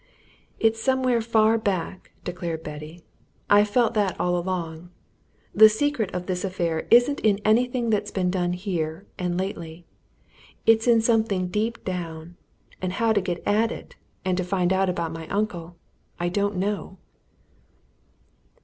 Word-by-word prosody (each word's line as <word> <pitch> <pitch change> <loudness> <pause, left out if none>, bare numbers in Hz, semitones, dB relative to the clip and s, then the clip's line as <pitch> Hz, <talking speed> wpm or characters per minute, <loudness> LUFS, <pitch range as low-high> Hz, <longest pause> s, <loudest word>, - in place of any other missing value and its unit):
"It's 225 0 +2
somewhere 255 -2 +2
far 225 0 +3
back," 190 -3 -3
declared 175 -3 -4
Betty. 150 +3 -9 0.5
"I've 205 +1 +6
felt 235 +2 +2
that 205 -4 0
all 180 0 +1
along. 175 -2 -3 0.6
The 215 +1 +9
secret 225 -2 0
of 180 -2 -4
all - - -18
this 180 -1 -2
affair 170 -4 -2
isn't 245 +5 +5
in 205 -2 +3
anything 240 +1 +2
that's 210 -1 0
been 185 -3 0
done 180 -1 0
here 180 -2 -3
and 175 -1 -1
lately 170 -3 -5 0.8
it's 225 +1 +4
in 230 -2 +5
something 220 -5 +1
deep 220 +4 -2
down. 170 -2 -5 0.5
And 185 0 -2
how 225 +2 +2
to 205 - +2
get 175 -2 -4
at 220 +3 +2
it, - - -9 0.3
and 185 -1 +1
to 185 - 0
find 180 0 +1
out 190 0 +2
about 170 -2 -2
my 165 -1 -7
uncle, 175 -4 -3 0.4
I 175 0 0
don't 200 +2 0
know." 195 0 -3
190 Hz, 150 wpm, -25 LUFS, 175-220 Hz, 0.8 s, The